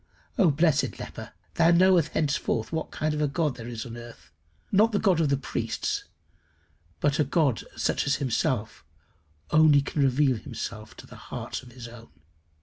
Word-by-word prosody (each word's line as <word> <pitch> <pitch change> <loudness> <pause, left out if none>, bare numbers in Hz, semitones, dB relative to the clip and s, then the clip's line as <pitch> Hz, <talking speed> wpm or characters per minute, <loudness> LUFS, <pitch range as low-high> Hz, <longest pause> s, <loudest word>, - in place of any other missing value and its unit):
Oh 195 -10 +4
blessed 155 +1 +2
leper! - - -8 0.2
thou 165 0 +4
knowest 175 -2 +4
henceforth 140 -7 -1
what 160 -1 -3
kind 155 0 -2
of 150 - -2
a 150 - +2
God 145 -1 -1
there 115 -1 -8
is 115 -2 -5
in 120 - -8
the 120 - -7
earth 120 0 -14 0.4
not 215 +3 +4
the - - +3
God 190 -6 +2
of 155 - +2
the 140 - +2
priests, 410 - -3 0.9
but 145 0 +1
a - - +5
God 145 -4 +1
such - - 0
as 140 - +3
himself 125 - -1 0.7
only 150 -2 +6
can 145 - -2
reveal 135 -2 +2
to 110 -2 -6 0.2
the - - -13
hearts - - -6
of 125 -1 -15
his 120 -1 -9
own. 115 0 -13
145 Hz, 175 wpm, -26 LUFS, 120-160 Hz, 0.9 s, only